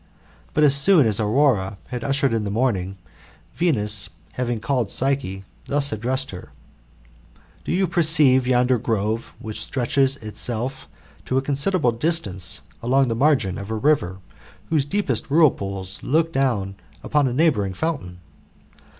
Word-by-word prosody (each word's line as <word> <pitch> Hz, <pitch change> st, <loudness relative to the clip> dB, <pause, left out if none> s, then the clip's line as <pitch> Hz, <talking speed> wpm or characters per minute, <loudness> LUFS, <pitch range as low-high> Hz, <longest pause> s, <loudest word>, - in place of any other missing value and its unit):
But 150 Hz, -, +3 dB
as 145 Hz, -2 st, +5 dB
soon 150 Hz, +1 st, +5 dB
as 105 Hz, -3 st, +1 dB
Aurora 110 Hz, -3 st, +1 dB
had 125 Hz, -2 st, -5 dB
ushered 140 Hz, -2 st, 0 dB
in 115 Hz, -2 st, -1 dB
the 100 Hz, -, -3 dB
morning, 100 Hz, -4 st, -1 dB, 0.6 s
Venus 105 Hz, -, 0 dB, 0.2 s
having 120 Hz, -2 st, -2 dB
called 115 Hz, -1 st, -1 dB
Psyche, 130 Hz, -8 st, 0 dB, 0.2 s
thus 140 Hz, +1 st, +2 dB
addressed 130 Hz, +5 st, -2 dB
her: 90 Hz, -1 st, -10 dB, 1.1 s
''Do -, -, -3 dB
you 190 Hz, +2 st, +1 dB
perceive 155 Hz, -7 st, +3 dB
yonder 125 Hz, -1 st, +2 dB
grove 110 Hz, +1 st, -2 dB
which 110 Hz, -1 st, -6 dB
stretches 135 Hz, +1 st, 0 dB
itself 120 Hz, +3 st, -4 dB, 0.4 s
to 130 Hz, -, -1 dB
a -, -, +2 dB
considerable 145 Hz, +1 st, +2 dB
distance! 115 Hz, -, 0 dB, 0.2 s
along 130 Hz, +2 st, +2 dB
the 115 Hz, -, -1 dB
margin 130 Hz, -8 st, +1 dB
Of 100 Hz, +1 st, -8 dB
a 110 Hz, -, -2 dB
river, 110 Hz, -7 st, 0 dB, 0.5 s
whose 150 Hz, -4 st, +2 dB
deepest 200 Hz, +2 st, -2 dB
whirlpools 100 Hz, -, +1 dB
look 165 Hz, +3 st, 0 dB
down 105 Hz, -8 st, -1 dB, 0.3 s
upon 150 Hz, -2 st, +1 dB
a 125 Hz, -, -2 dB
neighbouring 125 Hz, -, +1 dB
fountain? 90 Hz, -, -4 dB
125 Hz, 140 wpm, -22 LUFS, 105-140 Hz, 1.1 s, as